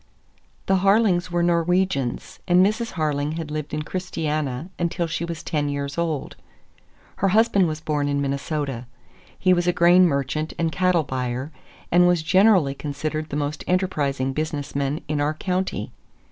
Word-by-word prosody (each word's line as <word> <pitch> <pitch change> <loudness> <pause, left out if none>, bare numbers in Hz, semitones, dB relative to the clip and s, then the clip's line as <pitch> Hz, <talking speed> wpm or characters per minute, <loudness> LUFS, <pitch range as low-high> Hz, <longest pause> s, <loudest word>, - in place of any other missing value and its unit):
The 190 - +3
Harlings 195 -2 +3
were 175 -1 0
Norwegians, 170 -5 0
and 180 +1 +5
Mrs. 215 +3 -1
Harling 150 -3 -1
had 160 -2 -5
lived 150 -1 -4
in 150 0 -2
Christiania 155 -4 -3
until 175 0 -1
she 170 +1 -3
was 170 -2 -6
ten 150 -3 -1
years 140 0 -3
old. 165 -4 -2 0.8
Her 195 - +1
husband 205 -2 +3
was 155 -1 -4
born 150 -2 -1
in 140 0 0
Minnesota. 140 -2 -3 0.5
He 185 -1 +3
was 175 0 +1
a - - +5
grain 175 +1 +5
merchant 145 +1 -2
and 165 -1 0
cattle 180 -2 +2
buyer, 130 +1 -3 0.4
and 175 +1 +5
was 175 -3 +2
generally 185 -4 +4
considered 155 +2 -4
the - - -4
most 145 0 -2
enterprising 145 -8 0
business 150 -1 -3
man 140 +2 -1
in 150 0 -1
our 150 +2 0
county. 185 +2 -2
155 Hz, 160 wpm, -23 LUFS, 145-180 Hz, 0.8 s, and